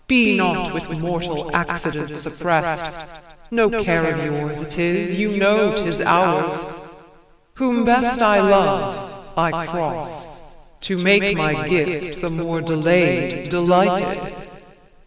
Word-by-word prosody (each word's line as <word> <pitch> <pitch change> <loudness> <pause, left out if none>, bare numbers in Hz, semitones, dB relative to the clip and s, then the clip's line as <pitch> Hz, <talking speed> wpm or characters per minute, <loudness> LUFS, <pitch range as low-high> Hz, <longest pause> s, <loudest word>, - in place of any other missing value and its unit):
Be 235 -4 +5
not 185 -2 0
with 170 - -6
mortal 170 -1 -4
accidents 155 -3 -4
opprest: 160 0 -3 0.4
No 225 -2 +1
care 165 -3 +1
of 160 -1 -4
yours 150 0 -4
it 150 -1 -9
is; 175 +1 -1
you 205 0 -1
know 205 +1 +3
'tis 205 - -2
ours. - - +2 1.0
Whom 245 -2 0
best 245 +1 +2
I 210 -2 +5
love 195 -1 +1
I 165 0 -1
cross; 165 -1 -6 0.4
to 190 - -3
make 200 +2 +4
my 155 0 -1
gift, 175 -1 -1
The 175 - -3
more 165 0 -4
delay'd, 170 +1 +1
delighted. 180 +2 +1
175 Hz, 120 wpm, -19 LUFS, 160-200 Hz, 1.0 s, Be